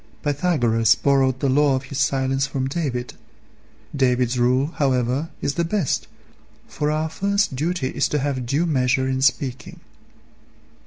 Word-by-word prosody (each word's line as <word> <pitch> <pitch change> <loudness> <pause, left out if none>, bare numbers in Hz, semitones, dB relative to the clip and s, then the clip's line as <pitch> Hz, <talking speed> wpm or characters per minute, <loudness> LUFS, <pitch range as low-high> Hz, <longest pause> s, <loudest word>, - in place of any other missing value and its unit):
Pythagoras 125 - +2
borrowed 135 -2 +1
the 140 - +1
law 140 +1 +3
of 130 - -3
his 130 +1 -6
silence 135 0 +1
from 130 -1 -2
David. 135 -5 -3 0.8
David's 125 -2 +1
rule, 130 +5 +2
however, 130 +1 0
is 140 - 0
the 170 - 0
best, 170 -3 -1 0.6
for 150 - -2
our 155 +1 0
first 200 0 0
duty 155 0 -1
is - - 0
to 150 - -1
have 135 -3 -2
due 145 +7 +1
measure 130 -4 +1
in 130 0 -1
speaking. 135 -2 -1
135 Hz, 145 wpm, -22 LUFS, 130-150 Hz, 0.8 s, law